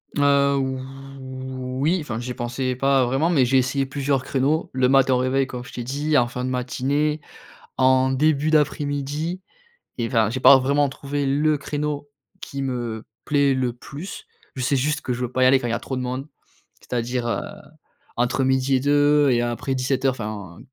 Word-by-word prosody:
Heu, 140 -2 +2 0.4
voui, 130 +4 -3
enfin, 120 -7 -4
j'y 125 +1 -5
pensais 125 +2 -2
pas 135 +1 +3
vraiment, 135 +7 +1
mais 140 -7 +4
j'ai 135 +2 +3
essayé 130 +2 +1
plusieurs 135 -1 -1
créneaux, 140 +4 0
le 130 -1 +2
matin 135 -1 +4
au - - +3
réveil, 130 +1 +1
comme 125 -2 -6
je - - -13
t'ai 120 - -4
dit, 145 +5 -1
en 120 - +2
fin 125 +1 -4
de 130 - -2
matinée, 140 +4 -1 0.6
en 130 0 +4
début 150 +2 +2
d'après-midi 150 +3 0 0.6
et 115 - 0
enfin, 115 -3 +2
j'ai 125 - -3
pas 135 - +9
vraiment 140 +2 +2
trouvé 140 +1 -3
le 150 +2 +2
créneau 145 0 -3 0.3
qui 140 0 -6
me 120 -4 -3 0.2
plaît 145 -2 +2
le 130 -2 0
plus. 150 - -9 0.3
Je 130 - -4
sais 140 +3 +1
juste 150 +4 0
que 125 - -3
je 125 - -4
veux 125 0 -3
pas 130 - 0
y - - +6
aller 135 +1 +6
quand 120 - -4
il - - -2
y - - 0
a 115 - -1
trop 130 - -5
de 130 - -2
monde. 130 +3 -4 0.5
C'est-à-dire, 120 0 -3
heu, 115 - -1 0.8
entre 120 +2 +1
midi 130 +1 +2
et - - 0
2 145 +1 +4
et 120 -2 +3
après 120 +3 -2
17:00, 130 +1 +1
enfin, 105 -7 -7
130 Hz, 190 wpm, -23 LUFS, 125-145 Hz, 0.8 s, pas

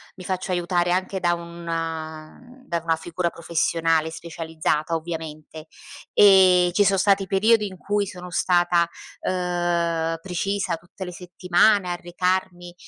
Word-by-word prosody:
mi 185 - -11
faccio 185 +1 -3
aiutare 175 0 0
anche 185 +1 -1
da 175 -1 +2
una 165 -2 -5 0.3
da 170 -6 -2
una 165 -1 +1
figura 170 +2 -3
professionale 165 -1 0
specializzata, 160 -1 -3
ovviamente. 160 -1 -7 0.5
Ehm, 185 -3 +6
ci 205 +3 +3
sono 195 0 +3
stati 195 0 +2
periodi 210 +3 +3
in 190 - -9
cui 205 +2 -1
sono 180 -2 -9
stata, 175 -1 +2 0.3
uhm, 175 -2 -1
precisa 185 0 -2
tutte 175 +3 -10
le 180 - -6
settimane 180 +2 +2
a 175 - -1
recarmi, 175 0 -2
175 Hz, 130 wpm, -23 LUFS, 165-185 Hz, 0.5 s, Ehm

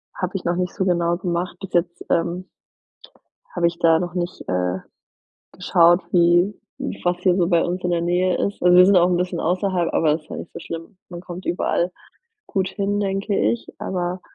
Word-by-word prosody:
Habe 185 -1 -3
ich 190 - -4
noch 175 0 +1
nicht 180 +1 -2
so 190 - -1
genau 170 -1 +1
gemacht 175 0 -3
bis 195 -2 -9
jetzt, 175 0 -1
ähm 175 +2 -1 1.1
habe 175 -1 +2
ich 170 0 -2
da 165 -1 +5
noch 175 0 -4
nicht, 175 0 -4
äh, 90 0 0 0.7
geschaut 175 -1 +4
wie 175 +3 +4 0.5
was 175 0 +1
hier 180 0 +2
so 175 -3 +2
bei 170 -2 +3
uns 180 +1 -3
in 180 - +1
der 170 -1 +1
Nähe 180 +2 +1
ist. 200 - -7
Und 180 0 +6
wir 180 0 +8
sind 200 0 +5
auch 175 0 +5
'n 180 - +2
bisschen 180 -1 -2
außerhalb, 180 0 0
aber 155 -2 +3
das 155 - -2
ist 155 - -27
ja - - -5
nicht - - -8
so - - -7
schlimm. 165 +4 -8
Man 175 -1 -8
kommt 180 +1 -9
überall 175 0 0 0.6
gut 190 -2 -1
hin 205 0 -1
denke 195 +1 -1
ich, 235 - 0
aber 180 0 -3
175 Hz, 205 wpm, -22 LUFS, 170-185 Hz, 1.1 s, wir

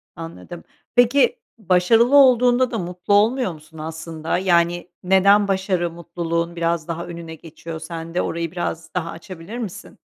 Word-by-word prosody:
Anladım. 165 - -9 0.3
Peki, 265 - +4 0.2
başarılı 225 +6 +3
olduğunda 250 -2 +5
da 230 - -2
mutlu 180 +2 -3
olmuyor 220 +2 +3
musun 155 0 -16
aslında? 160 +1 -4
Yani, 175 -1 +1
neden 200 +2 +4
başarı 190 -3 0
mutluluğun 170 0 -3
biraz 170 -1 -1
daha 170 0 -4
önüne 170 -1 -8
geçiyor 160 0 -9
sende? 165 +1 -4
Orayı 170 -1 -3
biraz 165 -2 -5
daha 165 -2 -2
açabilir 170 +5 -9
misin? 220 -7 -8
175 Hz, 135 wpm, -21 LUFS, 165-200 Hz, 0.3 s, olduğunda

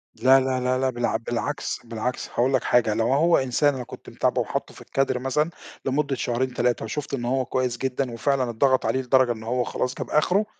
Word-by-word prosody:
لا، 130 +4 +5
لا، 130 -1 0
لا، 125 0 +1
لا، 130 0 +1
بالع 120 -2 -1
بالعكس، 120 +5 -3
بالعكس، 115 +1 -4
هاقول 130 +3 +1
لك 130 - +2
حاجة، 115 -3 +3
لو 115 +4 +1
هو 165 +4 +4
إنسان 135 +2 +2
أنا 130 - -4
كنت - - -11
متابعه - - 0
وحاطّه - - -4
في - - -14
الكادر 135 -2 0
مثلًا 150 +5 0 0.4
لمدة 140 +1 0
شهرين 125 +1 -1
3 120 -1 0
وشُفت 145 +5 -5
إن 120 -3 -2
هو 130 +1 0
كويس 125 -1 -1
جدًا، 130 0 -2
وفعلًا 130 +1 0
اتضغط 130 +3 +2
عليه 130 - +1
لدرجة 130 -1 +3
إن 110 -2 -5
هو 125 +2 0
خلاص 125 +1 -2
جاب - - -5
أخره، 180 +7 +2
130 Hz, 210 wpm, -24 LUFS, 120-135 Hz, 0.4 s, لا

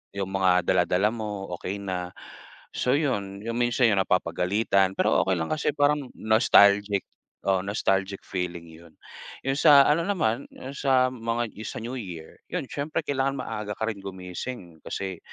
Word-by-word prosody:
'yung 95 -1 -3
mga 95 -2 +3
dala-dala 90 +3 +3
mo, 105 -4 -5
okey 100 +2 -5
na. 90 -2 -4 0.6
So 125 - +1
'yun, 100 -10 -2
'yung 115 +1 -3
minsan 120 0 +3
'yung 100 - +1
napapagalitan, 95 +2 +1
pero - - +3
okey 95 - +2
lang 80 - -2
kasi 150 - 0
parang 145 -2 +2
nostalgic, 100 -2 +4 0.5
oo, 95 -1 +3
nostalgic 95 -1 0
feeling 90 -3 -4
'yun. 80 0 -15 0.5
'Yung 135 +1 0
sa 145 -3 +8
ano 165 +3 +3
naman, 140 - 0
'yung 135 +2 -9
sa 130 -2 +3
mga 115 -1 -2 0.2
sa - - -5
new 125 +3 -5
year 85 -8 -8
'yun 180 -6 -2
siyempre 145 +2 -2
kailangan 135 -1 -1
maaga 105 -2 -4
ka 110 - -1
rin 105 - -5
gumising 90 -1 -7
kasi 95 -3 -4
105 Hz, 155 wpm, -26 LUFS, 95-130 Hz, 0.6 s, sa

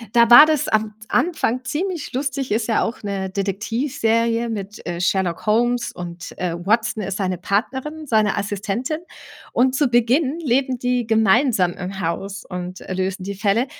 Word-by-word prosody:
Da 235 0 +6
war 295 +6 +11
das 310 -3 +1
am 215 0 0
Anfang 255 -8 0
ziemlich 330 +3 -3
lustig, 270 -1 -2
ist 220 +2 0
ja 225 - +2
auch 230 - -4
'ne 195 -2 -3
Detektivserie 230 +3 0
mit, 210 -2 -6
äh, 175 0 -3
„Sherlock 185 0 0
Holmes“ 240 +2 +2
und, 175 0 -8
äh, 180 -2 -2
Watson 220 +5 0
ist 195 -1 -3
seine 185 -3 -2
Partnerin, 265 - -2
seine 215 -6 +2
Assistentin. 205 - -2 0.5
Und 255 +1 +3
zu 285 0 +2
Beginn 255 +6 +2
leben 260 -3 +1
die 245 -1 -1
gemeinsam 220 -3 +3
im 190 +1 -6
Haus 195 +4 -4
und, 180 0 -6
äh, 185 - -6
lösen 185 0 -2
die 200 +1 -4
Fälle. 205 +4 +1
225 Hz, 160 wpm, -21 LUFS, 195-255 Hz, 0.5 s, war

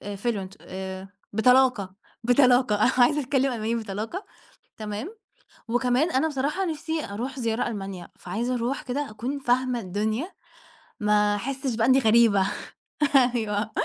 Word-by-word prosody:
Fluent 200 -3 -3
آآ 190 0 -7 0.3
بطلاقة، 245 -4 +3 0.3
بطلاقة، 245 -2 +4
أنا 250 - +4
عايزة 255 +4 +4
أتكلم 270 -1 +1
ألماني 225 0 -1
بطلاقة، 220 - -4 0.5
تمام. 215 - -6 0.5
وكمان 250 +6 +2
أنا 290 +3 +2
بصراحة 295 +6 -1
نفسي 320 -1 -3
أروح 245 +7 -5
زيارة 230 -1 -1
ألمانيا 195 -5 -6
فعايزة 230 +8 -2
أروح 245 +3 -2
كده 275 0 -3
أكون 250 +6 -4
فاهمة 250 -1 +1
الدنيا، 215 - -2 0.7
ما 210 0 +3
أحسش 265 +2 -3
بقى 225 +1 +1
إني 260 +1 +5
غريبة، 225 -4 +4 0.9
أيوه. 215 -2 -1
240 Hz, 125 wpm, -25 LUFS, 210-265 Hz, 0.9 s, إني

